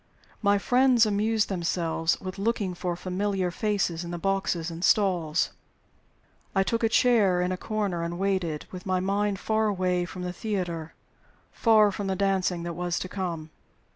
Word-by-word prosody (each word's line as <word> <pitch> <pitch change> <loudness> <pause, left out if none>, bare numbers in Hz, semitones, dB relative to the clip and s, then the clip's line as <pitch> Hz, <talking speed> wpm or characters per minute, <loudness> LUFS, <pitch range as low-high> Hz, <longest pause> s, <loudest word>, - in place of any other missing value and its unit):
My 205 -1 +4
friends 250 +2 +4
amused 215 +1 +1
themselves 170 -2 0
with 185 +1 -7
looking 205 -3 0
for 175 0 -3
familiar 185 +1 -1
faces 185 -4 -1
in 170 - -6
the 175 - -4
boxes 175 -2 -1
and 165 +1 -7
stalls. 180 -7 +2 1.0
I 195 - +4
took 230 +4 -1
a 225 - +4
chair 220 -7 +4
in 180 +1 0
a - - 0
corner 200 -3 -2
and 170 +1 -3
waited, 185 -5 -1
with 185 +1 -8
my 185 -1 +1
mind 200 +2 0
far 220 +1 +1
away 180 -3 0
from 180 0 -7
the 180 0 -3
theater, 175 -6 -3 0.6
from 210 -3 +3
the 190 - 0
dancing 190 -3 0
that 170 0 -4
was 175 +1 -2
to - - -3
come. 170 -5 -4
185 Hz, 165 wpm, -27 LUFS, 175-205 Hz, 1.0 s, My